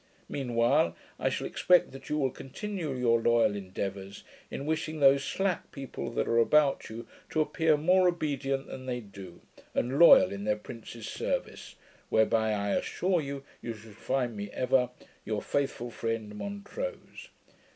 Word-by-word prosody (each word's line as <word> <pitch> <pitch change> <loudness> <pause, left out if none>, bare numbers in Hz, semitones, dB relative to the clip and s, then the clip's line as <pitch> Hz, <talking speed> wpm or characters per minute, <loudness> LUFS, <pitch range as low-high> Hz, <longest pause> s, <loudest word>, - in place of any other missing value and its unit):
Mean 125 -4 -4
while, 115 -8 +3 0.2
I - - +1
shall - - -3
expect 180 -1 +3
that 135 0 -11
you 150 - 0
will 135 -3 +1
continue 165 +2 -5
your 115 -2 +2
loyal 115 -3 +3
endeavours, 95 0 -5 0.3
in 140 - -5
wishing 155 0 -2
those 140 0 +6
slack 190 +3 -1
people 135 -2 -6
that - - 0
are 115 - +3
about 145 +4 +3
you, 115 +1 -8 0.2
to 155 - -1
appear 155 0 +2
more 180 +4 +4
obedient 140 -5 -1
than 130 0 -8
they 125 -1 -2
do, 100 -5 -11 0.3
and 130 +3 0
loyal 170 - +8
in 100 0 -5
their 105 0 +1
prince's 115 +1 -9
service; - - -3 0.3
whereby 110 0 +3
I 100 -1 -1
assure 180 -2 0
you, 140 -1 -5 0.2
you 115 -1 -5
shall 110 +1 -13
find 120 +2 -2
me 100 0 -5
ever 125 0 +2 0.3
Your - - -2
faithful 135 -4 -2
friend, 115 -2 -3
MONTROSE. 205 - -6
130 Hz, 160 wpm, -29 LUFS, 110-150 Hz, 0.3 s, loyal